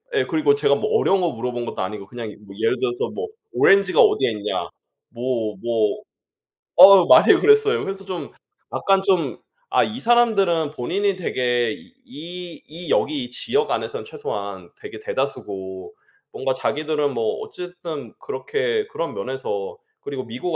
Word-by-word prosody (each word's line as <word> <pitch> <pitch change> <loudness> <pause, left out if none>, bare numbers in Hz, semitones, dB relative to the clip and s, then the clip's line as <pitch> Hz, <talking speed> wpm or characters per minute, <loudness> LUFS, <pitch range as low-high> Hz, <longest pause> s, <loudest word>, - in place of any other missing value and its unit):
예. - - +2
그리고 375 +7 +2
제가 435 0 +2
뭐 - - 0
어려운 195 - +2
거 175 - +2
물어본 120 -1 -4
것도 - - -3
아니고 100 +1 -6
그냥 115 -1 -7
뭐 100 - -11
예를 115 +3 +1
들어서 120 -1 -1
뭐 445 - -4 0.3
"오렌지가 195 -1 +5
어디에 130 -4 +4
있냐?" 105 -2 -3 0.4
뭐 115 -3 -2
뭐 115 -2 0 0.7
어. 190 0 +9
많이 - - +8
억울했어요. 430 +1 +4
그래서 195 0 -5
좀 185 -2 -6 0.4
약간 195 -1 +2
좀 185 -4 +1 0.4
아 - - +6
이 225 +4 -4
사람들은 200 - +3
본인이 190 +9 -1
되게 120 -9 0 0.3
이 175 - -9
이 165 +1 -9
여기 145 -2 +1
이 125 - -8
지역 435 - 0
안에서는 - - -3
최소한 445 +2 -6
되게 425 -1 -9
대다수고 95 - -5 0.4
뭔가 130 - -1
자기들은 150 +1 -1
뭐 115 -2 -1
어찌 180 - -7
됐든 175 -4 -8
그렇게 440 +1 -2
그런 - - -5
면에서 470 -1 -4 0.2
그리고 135 -2 -5
미국 130 +9 -4
175 Hz, 320 characters per minute, -22 LUFS, -, 0.7 s, 어